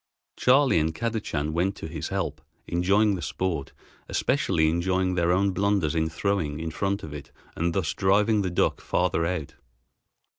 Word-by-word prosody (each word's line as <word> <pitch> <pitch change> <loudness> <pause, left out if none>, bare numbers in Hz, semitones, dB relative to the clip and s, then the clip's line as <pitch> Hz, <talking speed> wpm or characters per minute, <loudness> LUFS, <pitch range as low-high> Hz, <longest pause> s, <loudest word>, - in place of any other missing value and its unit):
Charley 130 - +4
and 80 +1 -1
Kadachan 105 -10 -2
went 90 +4 0
to - - -7
his 80 -1 -5
help, - - -3 0.2
enjoying 100 +5 +2
the 90 - -3
sport, 80 -1 -3 0.4
especially 130 - +1
enjoying 90 +3 +1
their 85 -1 +2
own 95 +2 +2
blunders 100 -5 +1
in 80 -1 0
throwing 80 -3 -1
in 80 0 -4
front 100 +5 -2
of 75 - -7
it 70 -2 -9 0.2
and 85 0 -1
thus 80 +1 0
driving 100 +2 +3
the 95 - -1
duck 85 - 0
farther 80 0 0
out. 85 -5 -3
90 Hz, 160 wpm, -26 LUFS, 80-100 Hz, 0.4 s, Charley